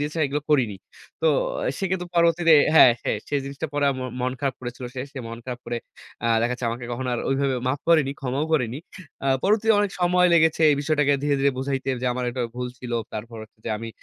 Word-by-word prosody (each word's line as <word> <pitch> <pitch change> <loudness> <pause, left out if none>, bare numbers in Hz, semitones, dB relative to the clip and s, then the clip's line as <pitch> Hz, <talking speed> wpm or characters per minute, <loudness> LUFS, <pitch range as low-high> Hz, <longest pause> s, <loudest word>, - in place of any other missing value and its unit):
দিয়েছে, 150 +3 -3
এগুলো 145 +2 -2
করিনি। 120 -9 +2 0.4
তো - - +2 0.5
সে 195 - -2
কিন্তু 180 -1 -2
পরবর্তীতে 170 -1 +4 0.2
হ্যাঁ, 125 -6 +9
হ্যাঁ - - -1
সে - - -3
জিনিসটা 140 +3 -5
পড়ে 145 0 0
আ - - 0
ম - - -3 0.2
মন 125 0 0
খারাপ 135 -3 -1
করেছিল 125 0 -7
সে। 130 - -4
সে 140 - -7
মন 115 0 -7
খারাপ 125 -1 -6
করে, 120 0 -2 0.5
আ - - +2
দেখা 120 +2 +1
যাচ্ছে, 125 -1 -3
আমাকে 120 +1 -5
কখনো 125 +2 -3
আর - - -2
ওইভাবে 135 0 +1
মাফ 140 +2 -1
করেনি, 155 -5 +4
ক্ষমাও 135 +3 -1
করেনি। 125 -4 +1 0.5
আ - - 0 0.2
পরবর্তীতে 220 +2 +3
অনেক 205 - 0
সময় 180 0 +4
লেগেছে, 160 -1 +3
এই 145 - +3
বিষয়টাকে 150 -1 +2
ধীরে, 145 -1 +2
ধীরে 140 +1 +4
বুঝাইতে 135 0 -2
যে, - - 0
আমার 125 0 -3
একটা 125 0 -3
ভুল 125 0 -3
ছিল। 120 -1 -7 0.2
তারপর 115 +2 -7
হচ্ছে 110 - -16
যে, - - -3
আমি 115 +1 -6
135 Hz, 225 wpm, -24 LUFS, 125-155 Hz, 0.5 s, হ্যাঁ